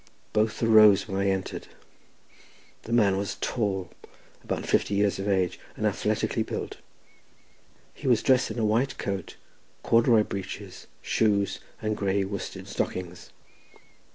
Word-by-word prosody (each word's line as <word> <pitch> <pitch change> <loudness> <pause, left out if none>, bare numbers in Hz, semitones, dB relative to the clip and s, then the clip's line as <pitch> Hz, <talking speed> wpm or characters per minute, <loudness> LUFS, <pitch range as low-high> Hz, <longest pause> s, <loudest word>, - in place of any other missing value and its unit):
Both 110 +2 +1
arose 110 -3 +6
when 95 -1 -2
I 100 - +1
entered; 95 -1 -3 1.2
the 115 - -7
man 105 -5 +4
was 100 0 -3
tall, 100 -6 -2 0.5
about - - -3
fifty 100 - +1
years 100 -1 +1
of 100 - -3
age, 95 -3 +1 0.2
and - - -2
athletically - - 0
built; - - -4 1.2
he 140 - -7
was 120 -4 +3
dressed 130 -1 +3
in - - -6
a 115 - +1
white 115 +6 +1
coat, 100 -2 -4 0.5
corduroy 115 -1 +4
breeches, 100 -2 -7 0.2
shoes, 100 -3 +1 0.2
and 110 0 0
grey 100 -1 0
worsted 100 0 -6
stockings. 90 -1 -4
100 Hz, 130 wpm, -27 LUFS, 95-110 Hz, 1.2 s, arose